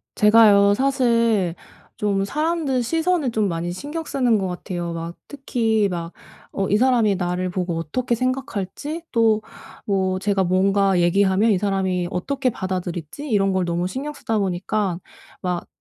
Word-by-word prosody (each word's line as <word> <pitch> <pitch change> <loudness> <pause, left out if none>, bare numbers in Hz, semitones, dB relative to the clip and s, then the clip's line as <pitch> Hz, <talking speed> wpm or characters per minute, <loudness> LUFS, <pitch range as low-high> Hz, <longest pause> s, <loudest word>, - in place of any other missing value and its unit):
제가요. 210 -2 +6
사실 230 -8 +2 0.4
좀 200 -2 0
사람들 300 -1 0
시선을 325 +1 0
좀 215 -2 +1
많이 170 -1 -3
신경 295 - -5
쓰는 250 -7 +1
것 195 -2 -1
같아요. 175 -1 -4
막 165 +1 -6
특히 225 -6 0
막 170 -1 -5 0.4
어 195 - -1
이 205 - +3
사람이 235 -4 +3
나를 180 0 -2
보고 175 -2 -2
어떻게 235 +10 -1
생각할지, 255 - -3
또 225 -2 +3 0.4
뭐 190 -2 0
제가 195 -1 +1
뭔가 195 +1 +2
얘기하면 190 +5 +3
이 200 - +3
사람이 190 -3 0
어떻게 260 +9 -1
받아들일지 185 - -5
이런 195 -3 +2
걸 185 -1 +1
너무 175 +1 -1
신경 275 +10 -5
쓰다 225 -6 -2
보니까 190 0 -1 0.4
막 180 -1 -2
200 Hz, 295 characters per minute, -22 LUFS, 180-245 Hz, 0.4 s, 제가요